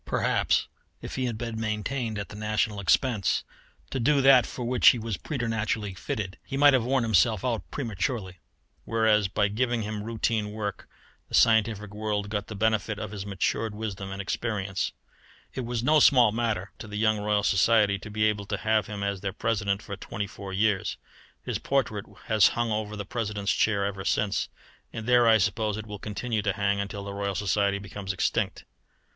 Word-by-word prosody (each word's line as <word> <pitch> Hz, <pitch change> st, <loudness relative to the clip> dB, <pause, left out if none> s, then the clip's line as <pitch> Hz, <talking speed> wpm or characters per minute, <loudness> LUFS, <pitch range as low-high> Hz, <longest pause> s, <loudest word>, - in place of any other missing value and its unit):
Perhaps -, -, +1 dB, 0.4 s
if -, -, -6 dB
he 130 Hz, -, -1 dB
had 120 Hz, -3 st, -2 dB
been 115 Hz, -1 st, -4 dB
maintained 110 Hz, +2 st, -2 dB
at 100 Hz, -2 st, -5 dB
the -, -, -10 dB
national 105 Hz, 0 st, -1 dB
expense 100 Hz, -, +2 dB, 0.5 s
to 135 Hz, -, -2 dB
do 140 Hz, +4 st, +3 dB
that 135 Hz, -2 st, +6 dB
for 125 Hz, -, -5 dB
which 125 Hz, +1 st, +3 dB
he -, -, +8 dB
was 115 Hz, -2 st, -3 dB
preternaturally 115 Hz, -, -2 dB
fitted, 95 Hz, +1 st, -4 dB
he 135 Hz, -, -5 dB
might 145 Hz, 0 st, +7 dB
have 130 Hz, -3 st, +3 dB
worn 130 Hz, +1 st, +1 dB
himself 110 Hz, +2 st, +3 dB
out 115 Hz, -7 st, -2 dB
prematurely; 100 Hz, -5 st, -3 dB, 0.4 s
whereas 110 Hz, -3 st, +2 dB
by 100 Hz, +1 st, +1 dB
giving 120 Hz, +2 st, 0 dB
him 105 Hz, 0 st, -4 dB
routine 110 Hz, -1 st, -1 dB
work 105 Hz, -3 st, -5 dB, 0.4 s
the -, -, -1 dB
scientific 110 Hz, -2 st, +3 dB
world 105 Hz, -1 st, -2 dB
got 105 Hz, -1 st, -2 dB
the 105 Hz, -, -7 dB
benefit 110 Hz, 0 st, 0 dB
of 100 Hz, -, -5 dB
his 100 Hz, -1 st, -6 dB
matured 105 Hz, +2 st, -1 dB
wisdom 100 Hz, -3 st, -5 dB
and 100 Hz, +1 st, -4 dB
experience. 100 Hz, -2 st, -2 dB, 0.6 s
It 130 Hz, -, -4 dB
was 120 Hz, -1 st, -2 dB
no 155 Hz, +4 st, +5 dB
small 125 Hz, -6 st, +6 dB
matter 110 Hz, -4 st, -1 dB
to -, -, -8 dB
the 105 Hz, 0 st, -6 dB
young 110 Hz, 0 st, +2 dB
Royal 105 Hz, 0 st, +1 dB
Society 100 Hz, 0 st, +3 dB
to 105 Hz, -, -9 dB
be 110 Hz, +1 st, -1 dB
able 105 Hz, -2 st, +1 dB
to 100 Hz, -, -2 dB
have 110 Hz, +1 st, +1 dB
him 105 Hz, -1 st, -5 dB
as 100 Hz, -2 st, -2 dB
their 100 Hz, -, -2 dB
President 105 Hz, -2 st, -1 dB
for 100 Hz, -3 st, -6 dB
twenty 105 Hz, -, -5 dB
four 100 Hz, -1 st, -9 dB
years. 100 Hz, 0 st, +1 dB, 0.5 s
His -, -, -3 dB
portrait 125 Hz, -7 st, -1 dB, 0.2 s
has 110 Hz, -3 st, +5 dB
hung 120 Hz, -1 st, 0 dB
over 105 Hz, 0 st, -2 dB
the 100 Hz, -1 st, -5 dB
President's 105 Hz, -2 st, -2 dB
chair 100 Hz, -2 st, +2 dB
ever 100 Hz, -1 st, -4 dB
since, 100 Hz, 0 st, 0 dB, 0.4 s
and 110 Hz, -, -6 dB
there 120 Hz, -1 st, +5 dB
I 110 Hz, -1 st, +7 dB
suppose 105 Hz, +1 st, 0 dB
it 110 Hz, -, -6 dB
will 105 Hz, -2 st, -7 dB
continue 110 Hz, +2 st, -2 dB
to 100 Hz, -1 st, 0 dB
hang 100 Hz, 0 st, 0 dB
until 100 Hz, 0 st, -4 dB
the 100 Hz, 0 st, -6 dB
Royal 100 Hz, -1 st, -2 dB
Society 100 Hz, 0 st, +1 dB
becomes 100 Hz, -1 st, -5 dB
extinct. 90 Hz, -, -1 dB
105 Hz, 190 wpm, -27 LUFS, 100-115 Hz, 0.6 s, he